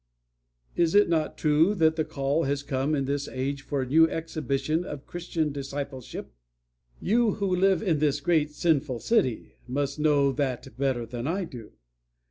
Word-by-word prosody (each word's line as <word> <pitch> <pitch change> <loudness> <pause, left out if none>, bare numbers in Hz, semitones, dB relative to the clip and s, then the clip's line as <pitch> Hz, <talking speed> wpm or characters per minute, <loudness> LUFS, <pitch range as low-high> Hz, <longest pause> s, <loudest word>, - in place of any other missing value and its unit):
"Is 170 +1 +2
it 205 -2 +6
not 160 -2 0
true 155 +6 +3
that 160 -3 +3
the 160 - +1
call 140 +3 -1
has 140 +1 -1
come 140 +2 0
in 135 -2 -1
this 140 +1 -2
age 135 +2 -3
for 140 -1 -2
a - - -6
new 160 +4 +5
exhibition 155 -1 -2
of 150 -6 -7
Christian 170 -3 -2
discipleship? 140 - -6 0.7
You 225 +1 +2
who 195 -3 0
live 195 +3 +3
in 165 -7 +1
this 145 -1 +1
great 150 0 +2
sinful 150 -4 0
city 130 - 0
must 140 +3 -2
know 145 -2 +3
that 130 -5 -3
better 130 -3 -1
than 120 +2 -5
I 185 +4 -1
do. 120 -10 -10
145 Hz, 165 wpm, -27 LUFS, 135-165 Hz, 0.7 s, it